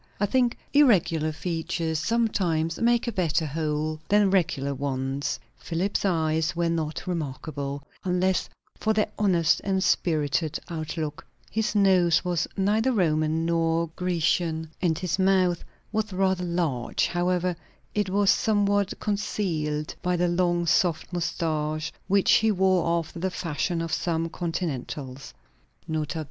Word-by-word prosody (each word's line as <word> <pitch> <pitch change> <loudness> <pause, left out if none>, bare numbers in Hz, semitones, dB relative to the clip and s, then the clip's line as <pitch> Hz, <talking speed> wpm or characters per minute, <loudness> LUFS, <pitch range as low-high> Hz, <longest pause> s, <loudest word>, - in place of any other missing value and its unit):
I 205 - +3
think 245 +3 +1 0.2
irregular 170 - +4
features 165 0 -2
sometimes 170 -5 0
make 240 +1 +2
a - - 0
better 170 -5 0
whole 155 +1 -2
than 205 -1 +4
regular 160 -7 +1
ones. 135 0 -2 0.2
Philip's 180 +5 -1
eyes 160 -2 +1
were 170 0 +1
not 160 -1 -2
remarkable, 145 -4 -4 0.2
unless 185 0 +1 0.3
for 220 - 0
their 215 -1 +1
honest 175 -6 +3
and 190 -1 0
spirited 155 -4 +1
outlook; 155 -2 -4 0.3
his 220 +1 -1
nose 185 -4 +4
was 175 -2 0
neither 215 +6 +2
Roman 160 -5 +1
nor 165 0 +1
Grecian, 165 -2 0
and 165 -4 +1
his 180 +1 -2
mouth 185 -2 +3 0.3
was 215 0 -1
rather 190 -1 +1
large; 165 -9 0
however, 180 0 0 0.4
it 210 -2 0
was 200 +1 +4
somewhat 205 -2 +1
concealed 170 -8 -2
by 180 0 +1
the 175 0 +2
long 175 0 +1
soft 170 0 +1
moustache, 155 -2 -2
which 195 0 +3
he 220 0 +5
wore 190 -3 +2
after 165 +1 -5
the 190 +2 0
fashion 170 0 -2
of 165 -1 -4
some 165 -1 0
Continentals 145 - -4 0.5
(N. 160 -1 -1
B. 150 - -5
170 Hz, 130 wpm, -26 LUFS, 155-190 Hz, 0.5 s, he